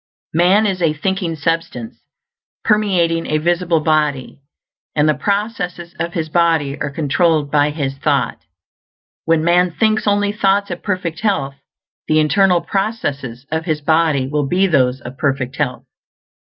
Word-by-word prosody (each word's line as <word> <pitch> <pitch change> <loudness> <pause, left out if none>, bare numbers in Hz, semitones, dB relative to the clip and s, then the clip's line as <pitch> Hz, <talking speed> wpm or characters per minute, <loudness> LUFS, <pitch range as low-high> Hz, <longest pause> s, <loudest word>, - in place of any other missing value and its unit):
Man 180 +6 +4
is 190 -3 -1
a 160 -3 +2
thinking 180 +1 -2
substance, 165 - -3 0.6
permeating 180 -6 +1
a 155 - +1
visible 170 0 +1
body, 150 -4 0 0.5
and 150 0 +3
the 155 - +4
processes 195 -3 -3
of 170 0 -3
his 160 -2 -2
body 160 -4 +1
are - - -1
controlled 150 +1 +1
by 145 0 +3
his 140 -3 -4
thought. 140 -5 0 0.9
When 165 -1 +2
man 175 +2 +3
thinks 215 +5 0
only 205 0 +2
thoughts 200 -1 +1
of 175 - -5
perfect 180 -4 -3
health, 185 -11 0 0.5
the 155 - +3
internal 180 +3 +3
processes 145 - -3
of 160 0 -2
his 155 -3 -1
body 155 -3 +2
will 145 0 -1
be 185 +6 +2
those 130 -7 +2
of 125 +2 -10
perfect 135 -3 -1
health. 140 -4 -2
165 Hz, 145 wpm, -18 LUFS, 145-185 Hz, 0.9 s, Man